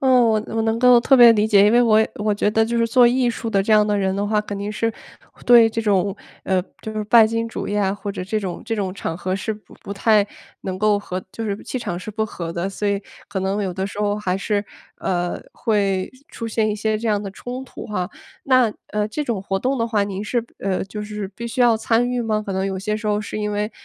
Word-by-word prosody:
呃， 265 Hz, -, +1 dB, 0.2 s
我 220 Hz, -1 st, +2 dB
我 225 Hz, 0 st, -1 dB
能 225 Hz, +1 st, 0 dB
够 250 Hz, -1 st, +7 dB
特 270 Hz, +3 st, +4 dB
别 240 Hz, -2 st, +9 dB
理 210 Hz, -1 st, +2 dB
解， 205 Hz, -2 st, +5 dB
因 205 Hz, -, +5 dB
为 240 Hz, -, +5 dB
我 220 Hz, -2 st, +5 dB
我 210 Hz, 0 st, 0 dB
觉 205 Hz, 0 st, +1 dB
得 220 Hz, +1 st, +3 dB
就 235 Hz, +1 st, -2 dB
是 230 Hz, -, +3 dB
做 245 Hz, +1 st, +6 dB
艺 245 Hz, 0 st, +2 dB
术 230 Hz, 0 st, -5 dB
的 195 Hz, -3 st, +2 dB
这 215 Hz, -, +1 dB
样 210 Hz, -1 st, +5 dB
的 210 Hz, -1 st, +1 dB
人 190 Hz, -1 st, 0 dB
的 200 Hz, +1 st, -1 dB
话 210 Hz, 0 st, +1 dB
肯 205 Hz, -1 st, -6 dB
定 200 Hz, +1 st, -3 dB
是， 225 Hz, +1 st, -1 dB, 0.5 s
对 235 Hz, -2 st, +7 dB
这 225 Hz, -, -2 dB
种， 200 Hz, -2 st, +1 dB, 0.3 s
呃， 190 Hz, -1 st, +1 dB, 0.2 s
就 220 Hz, -, -5 dB
是 215 Hz, -1 st, -3 dB
拜 225 Hz, +2 st, +7 dB
金 230 Hz, +1 st, -1 dB
主 -, -, -5 dB
义 205 Hz, -, -1 dB
啊， 195 Hz, -1 st, +1 dB
或 205 Hz, 0 st, -5 dB
者 185 Hz, -, -5 dB
这 215 Hz, +3 st, -1 dB
种 185 Hz, -3 st, -5 dB
这 225 Hz, -, -2 dB
种 195 Hz, -4 st, -2 dB
场 165 Hz, -3 st, -4 dB
合 185 Hz, +2 st, -2 dB
是 220 Hz, +3 st, -3 dB
不 210 Hz, -, -17 dB
不 200 Hz, -, -7 dB
太 210 Hz, 0 st, +3 dB, 0.4 s
能 185 Hz, -1 st, -3 dB
够 210 Hz, +1 st, +2 dB
和 185 Hz, -2 st, -5 dB
就 225 Hz, -, -6 dB
是 200 Hz, -2 st, -2 dB
气 255 Hz, -, -4 dB
场 175 Hz, -7 st, -4 dB
是 185 Hz, +4 st, -6 dB
不 220 Hz, +1 st, -2 dB
和 170 Hz, -5 st, -6 dB
的， 175 Hz, +3 st, -2 dB
所 205 Hz, +1 st, -2 dB
以 200 Hz, -1 st, 0 dB, 0.3 s
可 205 Hz, -, -3 dB
能 195 Hz, +2 st, -1 dB
有 190 Hz, -, -2 dB
的 190 Hz, +2 st, -3 dB
时 200 Hz, -, -6 dB
候 205 Hz, 0 st, +1 dB
还 185 Hz, -3 st, -1 dB
是， 205 Hz, +1 st, -1 dB, 0.3 s
呃， 175 Hz, -1 st, -2 dB
会 195 Hz, -4 st, 0 dB, 0.2 s
出 230 Hz, -, -5 dB
现 220 Hz, -1 st, +1 dB
一 210 Hz, -, 0 dB
些 215 Hz, +1 st, -1 dB
这 230 Hz, -, -4 dB
样 210 Hz, -2 st, +1 dB
的 200 Hz, -, -5 dB
冲 250 Hz, +6 st, -7 dB
突 -, -, -10 dB
哈。 185 Hz, -4 st, -3 dB, 0.3 s
那 255 Hz, -4 st, +3 dB, 0.2 s
呃， 210 Hz, 0 st, -1 dB
这 260 Hz, +8 st, -3 dB
种 235 Hz, -8 st, -2 dB
活 195 Hz, 0 st, -2 dB
动 260 Hz, +6 st, -1 dB
的 230 Hz, -, +1 dB
话 220 Hz, -3 st, +1 dB
您 200 Hz, 0 st, -4 dB
是 235 Hz, +2 st, -1 dB
呃， 190 Hz, -1 st, -1 dB
就 210 Hz, +2 st, -7 dB
是 210 Hz, -1 st, -5 dB
必 215 Hz, +5 st, -7 dB
须 235 Hz, +2 st, -4 dB
要 240 Hz, -2 st, +5 dB
参 230 Hz, +2 st, +1 dB
与 250 Hz, -1 st, -1 dB
吗？ 215 Hz, -2 st, 0 dB
可 200 Hz, -, -4 dB
能 190 Hz, +1 st, -1 dB
有 190 Hz, -1 st, -3 dB
些 210 Hz, +3 st, -2 dB
时 215 Hz, 0 st, -6 dB
候 210 Hz, 0 st, +1 dB
是 210 Hz, -, -5 dB
因 210 Hz, 0 st, -2 dB
为 210 Hz, +1 st, -1 dB
210 Hz, 285 characters per minute, -21 LUFS, 195-225 Hz, 0.5 s, 别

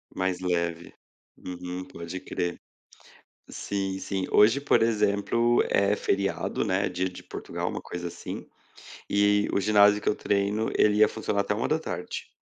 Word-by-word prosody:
Mais 95 Hz, -1 st, -1 dB
leve. 85 Hz, -2 st, -2 dB, 0.4 s
Uhum, 90 Hz, 0 st, -6 dB
pode 85 Hz, +2 st, -7 dB
crer. 90 Hz, -1 st, -3 dB, 0.9 s
Sim, 95 Hz, -1 st, -3 dB
sim. 95 Hz, -1 st, -2 dB
Hoje, 115 Hz, +7 st, +5 dB
por 145 Hz, -, +3 dB
exemplo, 115 Hz, +2 st, +2 dB
é 100 Hz, +1 st, +3 dB
feriado, 100 Hz, -1 st, -1 dB
né, 95 Hz, +1 st, +1 dB
Dia 90 Hz, +1 st, -1 dB
de 90 Hz, -, -11 dB
Portugal, -, -, -5 dB
uma -, -, -5 dB
coisa 85 Hz, 0 st, -6 dB
assim. -, -, -7 dB, 0.6 s
E 105 Hz, 0 st, +3 dB
o -, -, +2 dB
ginásio 105 Hz, 0 st, +5 dB
que -, -, -1 dB
eu -, -, +2 dB
treino, 100 Hz, +2 st, 0 dB
ele 105 Hz, 0 st, +4 dB
ia 110 Hz, -, +6 dB
funcionar 105 Hz, -2 st, -2 dB
até 100 Hz, +1 st, 0 dB
13h. 115 Hz, -, -3 dB
100 Hz, 145 wpm, -27 LUFS, 90-105 Hz, 0.9 s, ia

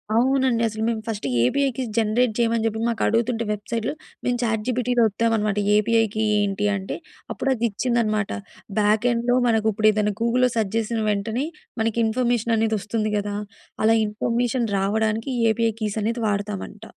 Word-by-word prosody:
అవునండి. 260 Hz, -1 st, +2 dB
అసలు 220 Hz, 0 st, -4 dB
మేము 225 Hz, -2 st, -1 dB
ఫస్ట్ 215 Hz, -2 st, -4 dB, 0.2 s
ఏపీఐ‌‌ 275 Hz, -, +2 dB
కీ 260 Hz, -, -1 dB
జనరేట్ 225 Hz, +1 st, +2 dB
చేయమని 230 Hz, -1 st, +2 dB
చెప్పి 220 Hz, 0 st, -1 dB
మాకు 230 Hz, -1 st, -2 dB
అడుగుతుంటే 230 Hz, 0 st, +1 dB
వెబ్సైట్‌లో 225 Hz, +4 st, -3 dB, 0.3 s
మేము 245 Hz, -1 st, +1 dB
చాట్ 220 Hz, -2 st, 0 dB
జీపీటీ‌లో 245 Hz, -1 st, +1 dB
ఓత్తామనమాట 215 Hz, -1 st, 0 dB, 0.2 s
ఏపీఐ 225 Hz, +2 st, +3 dB
కి 220 Hz, -, +1 dB, 0.2 s
ఏంటి 205 Hz, 0 st, 0 dB
అంటే, 195 Hz, 0 st, -4 dB, 0.4 s
అప్పుడు 270 Hz, -, -2 dB
అది 235 Hz, +1 st, -1 dB
ఇచ్చిందనమాట 215 Hz, -2 st, 0 dB, 0.5 s
బ్యాక్ 210 Hz, +3 st, +2 dB
ఎండ్‌లో 240 Hz, +1 st, +1 dB
మనకు 220 Hz, -2 st, +2 dB
ఇప్పుడేదైనా 215 Hz, -1 st, +2 dB
గూగుల్‌లో 250 Hz, +2 st, +3 dB
సెర్చ్ 215 Hz, -2 st, -1 dB
చేసిన 225 Hz, 0 st, -1 dB
వెంటనే 220 Hz, +7 st, -1 dB, 0.4 s
మనకి 225 Hz, +1 st, 0 dB
ఇన్ఫర్మేషన్ 235 Hz, 0 st, +1 dB
అనేది 220 Hz, 0 st, +1 dB
వస్తుంది 215 Hz, +2 st, -2 dB
కదా, 205 Hz, 0 st, -3 dB, 0.5 s
అలా 225 Hz, +1 st, +5 dB
ఇన్ఫర్మేషన్ 235 Hz, +3 st, -1 dB
రావడానికి 220 Hz, +5 st, 0 dB, 0.2 s
ఏపీఐ 225 Hz, 0 st, +1 dB
కీస్ 215 Hz, 0 st, -1 dB
అనేది 230 Hz, +3 st, -1 dB
వాడతామంట. 205 Hz, +1 st, -3 dB
225 Hz, 150 wpm, -23 LUFS, 210-235 Hz, 0.5 s, అలా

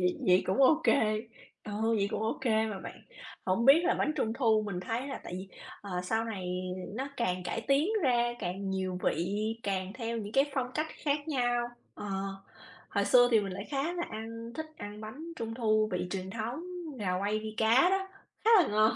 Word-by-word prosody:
vậy 180 Hz, 0 st, +2 dB
vậy 180 Hz, 0 st, +6 dB
cũng 225 Hz, +9 st, +3 dB
ô 310 Hz, +4 st, +6 dB
kê, -, -, +6 dB, 0.7 s
ừ, 215 Hz, -, -6 dB, 0.2 s
vậy 200 Hz, -1 st, +1 dB
cũng -, -, -2 dB
ô 220 Hz, -, -1 dB
kê 220 Hz, -4 st, +2 dB
mà 210 Hz, -3 st, -4 dB
bạn. -, -, -9 dB, 0.5 s
Hổng 190 Hz, +5 st, +2 dB
biết 305 Hz, +6 st, +7 dB
là -, -, +3 dB
bánh 305 Hz, -, +1 dB
Trung 220 Hz, -, 0 dB
thu 225 Hz, -3 st, +3 dB
mình 185 Hz, -3 st, -3 dB
thấy 230 Hz, +8 st, -3 dB
là 270 Hz, -, -5 dB
tại -, -, -7 dB
vì, 190 Hz, +1 st, -7 dB, 0.3 s
ờ, 200 Hz, -, -9 dB
sau 220 Hz, +5 st, 0 dB
này 195 Hz, -5 st, -4 dB, 0.5 s
nó 265 Hz, +4 st, -3 dB
càng 185 Hz, -6 st, 0 dB
cải 180 Hz, +5 st, -2 dB
tiến 275 Hz, +7 st, +2 dB
ra 240 Hz, -3 st, +3 dB
càng 190 Hz, +1 st, -3 dB
nhiều 185 Hz, -1 st, -2 dB
vị 170 Hz, -, +1 dB, 0.4 s
càng 190 Hz, -1 st, -2 dB
theo 230 Hz, -1 st, -3 dB
những 210 Hz, -1 st, -6 dB
cái 275 Hz, +2 st, +5 dB
phong 255 Hz, -2 st, -1 dB
cách 310 Hz, +1 st, 0 dB, 0.2 s
khác 290 Hz, +1 st, 0 dB
nhau. 245 Hz, -4 st, +1 dB, 0.3 s
Ờ, -, -, -8 dB, 0.8 s
hồi 200 Hz, -, +1 dB
xưa 245 Hz, +3 st, +6 dB
thì 225 Hz, -2 st, +5 dB
mình 195 Hz, -2 st, -4 dB
lại 195 Hz, +2 st, -5 dB
khá 285 Hz, +5 st, 0 dB
là 350 Hz, -, -2 dB
ăn 230 Hz, +1 st, -6 dB
thích 315 Hz, 0 st, -4 dB
ăn 205 Hz, +1 st, -7 dB
bánh 220 Hz, +8 st, -8 dB
Trung 225 Hz, -1 st, -4 dB
thu 215 Hz, -2 st, +2 dB
vị 180 Hz, 0 st, -1 dB
truyền 190 Hz, 0 st, -4 dB
thống, 230 Hz, -, -4 dB, 0.3 s
gà 185 Hz, -3 st, 0 dB
quay 205 Hz, +2 st, 0 dB
vi 215 Hz, 0 st, -6 dB
cá 235 Hz, +11 st, +5 dB
đó, 385 Hz, 0 st, 0 dB, 0.4 s
khá 450 Hz, -, +5 dB
là -, -, -1 dB
ngon! 215 Hz, +1 st, +4 dB
220 Hz, 210 wpm, -31 LUFS, 200-255 Hz, 0.8 s, biết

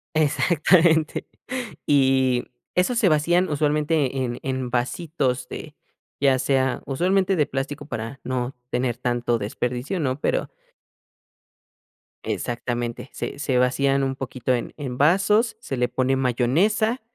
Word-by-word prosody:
Exactamente, 160 Hz, +1 st, +3 dB, 0.6 s
y 130 Hz, -3 st, +3 dB, 0.3 s
esos 205 Hz, +7 st, +2 dB
se 210 Hz, -, +4 dB
vacían 170 Hz, +4 st, +3 dB
usualmente 150 Hz, -1 st, +1 dB
en 120 Hz, -1 st, -4 dB
en 130 Hz, -1 st, -2 dB
vasitos 130 Hz, 0 st, -1 dB
de, 150 Hz, -1 st, -8 dB, 0.4 s
ya 135 Hz, -2 st, +4 dB
sea 130 Hz, -2 st, +1 dB
usualmente 185 Hz, +7 st, +1 dB
de 150 Hz, -3 st, +2 dB
plástico 140 Hz, +2 st, -4 dB
para 115 Hz, 0 st, -6 dB
no 125 Hz, 0 st, -2 dB
tener 125 Hz, -1 st, 0 dB
tanto 120 Hz, -1 st, 0 dB
desperdicio, 125 Hz, -, -3 dB
¿no?, 135 Hz, -1 st, -1 dB
pero. -, -, 0 dB, 1.8 s
Exactamente, 120 Hz, 0 st, -3 dB
se -, -, -5 dB
se 135 Hz, -4 st, 0 dB
vacían 135 Hz, +2 st, +2 dB
un 135 Hz, 0 st, 0 dB
poquito 130 Hz, -1 st, -3 dB
en 120 Hz, -, -3 dB
en 130 Hz, -4 st, -5 dB
vasos, 195 Hz, -, +3 dB
se 135 Hz, -, -5 dB
le 125 Hz, 0 st, +2 dB
pone 130 Hz, +1 st, +1 dB
mayonesa, 160 Hz, -, +1 dB
135 Hz, 125 wpm, -23 LUFS, 125-155 Hz, 1.8 s, se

